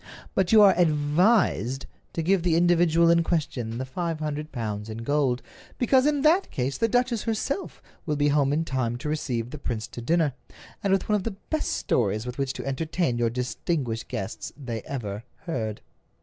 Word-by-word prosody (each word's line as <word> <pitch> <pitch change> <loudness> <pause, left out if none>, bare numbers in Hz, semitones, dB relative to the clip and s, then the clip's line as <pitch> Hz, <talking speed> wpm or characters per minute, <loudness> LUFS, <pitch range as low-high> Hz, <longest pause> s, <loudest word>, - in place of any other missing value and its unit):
But 190 -2 +1
you 215 -1 +8
are 195 - +8
advised 150 - +2 0.3
to 165 - -2
give 190 +2 +3
the 170 -2 +2
individual 170 -1 +4
in 170 0 +5
question 135 -9 -2
the 130 - -3
five 165 +5 -3
hundred 150 0 -4
pounds 110 -3 -4
in 110 +1 -6
gold, 135 -2 +1 0.3
because 260 +2 +4
in 290 -2 +1
that 335 +6 +4
case 130 +2 -2
the 230 - +3
duchess 245 -1 +1
herself 235 - -3 0.2
will 150 - +1
be 145 0 +2
home 140 -1 +3
in 160 +3 +1
time 125 -5 -1
to 150 +4 -4
receive 125 -6 -2
the 150 - -7
prince 115 -5 -3
to 120 - -8
dinner, 160 +2 +2 0.5
and 200 - +1
with 195 -1 +2
one 210 - +3
of 195 - -4
the 225 -2 -4 0.2
best 310 -1 0
stories 110 -1 0
with 125 +2 -6
which 135 -1 -1
to - - -6
entertain 145 -1 -1
your 120 -1 +2
distinguished 125 0 -2
guests 100 +1 -5
they 120 -6 -5
ever 105 -5 -4 0.2
heard. 110 - -3
150 Hz, 190 wpm, -26 LUFS, 125-175 Hz, 0.5 s, you